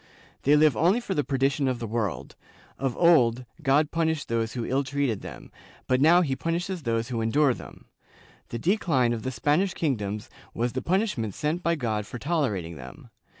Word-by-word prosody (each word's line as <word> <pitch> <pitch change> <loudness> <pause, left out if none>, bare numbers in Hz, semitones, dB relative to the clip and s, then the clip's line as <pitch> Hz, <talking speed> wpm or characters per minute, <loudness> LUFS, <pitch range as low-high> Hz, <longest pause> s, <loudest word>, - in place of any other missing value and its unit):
They 145 +2 +4
live 150 -1 +4
only 180 +8 +3
for 235 -5 -4
the 150 -5 0
perdition 135 +1 0
of 130 -1 0
the 120 - -5
world; 110 -4 -3 0.4
of 135 -3 -2
old, 125 -8 +4 0.2
God 145 +1 +2
punished 160 -2 -1
those 115 -1 -1
who 120 -3 -3
ill 135 +2 0
treated 135 -5 -1
them, - - -10 0.3
but 130 0 +1
now 170 +4 +6
he 140 -6 0
punishes 175 +4 -2
those 115 -2 -1
who 115 -3 -2
endure 135 +4 +3
them; - - -12 0.6
the 120 - -4
decline 140 - +1
of 115 - -4
the 130 - -3
Spanish 155 +8 +1
kingdoms 105 -9 -2 0.3
was 120 +1 -1
the 130 - -2
punishment 170 - -1
sent 155 +4 -1
by 170 -1 +1
God 110 -7 -2
for - - -7
tolerating 115 - -2
them. 65 -1 -12
135 Hz, 185 wpm, -26 LUFS, 115-160 Hz, 0.6 s, now